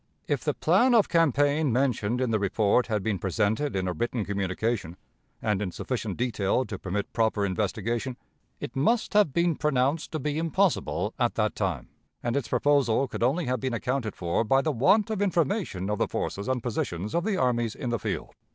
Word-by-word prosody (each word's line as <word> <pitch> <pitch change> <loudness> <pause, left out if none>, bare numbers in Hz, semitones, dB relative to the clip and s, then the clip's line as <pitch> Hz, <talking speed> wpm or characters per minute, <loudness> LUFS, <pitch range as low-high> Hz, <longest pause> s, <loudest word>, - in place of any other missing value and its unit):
"If - - -1
the - - 0
plan 250 0 +4
of 220 - +4
campaign 145 -3 +3
mentioned 125 -2 0
in 125 -3 0
the 110 - +2
report 100 +4 +2
had 105 -4 -1
been 105 -3 -1
presented 110 - 0
in 95 -1 -1
a 90 - -1
written 120 +4 -2
communication, 100 -1 -2 0.5
and 105 -2 +1
in 100 - -1
sufficient 110 +1 -4
detail 120 0 0
to 105 -6 -6
permit 100 +2 -3
proper 110 -3 +1
investigation, 110 +5 -2 0.4
it - - -6
must 220 - +1
have 210 -8 +4
been 170 +2 +2
pronounced 145 +2 0
to 155 - -1
be 150 +2 -2
impossible 165 +3 0
at - - +1
that - - +1
time, - - -2 0.3
and 120 0 -1
its 140 -5 -1
proposal 135 0 +2
could - - -6
only 140 +8 +2
have 125 +1 -1
been 130 -3 -2
accounted 125 -1 -2
for 85 +5 0
by 135 +5 +3
the 155 - +1
want 200 - +3
of 210 -2 -2
information 175 - 0
of 105 0 -1
the - - +2
forces 100 - -3
and 130 -3 -1
positions 105 -4 -3
of 170 - +1
the 205 -1 0
armies 120 -3 +1
in 125 -4 -4
the 115 - 0
field. - - -4
120 Hz, 195 wpm, -27 LUFS, 105-145 Hz, 0.5 s, plan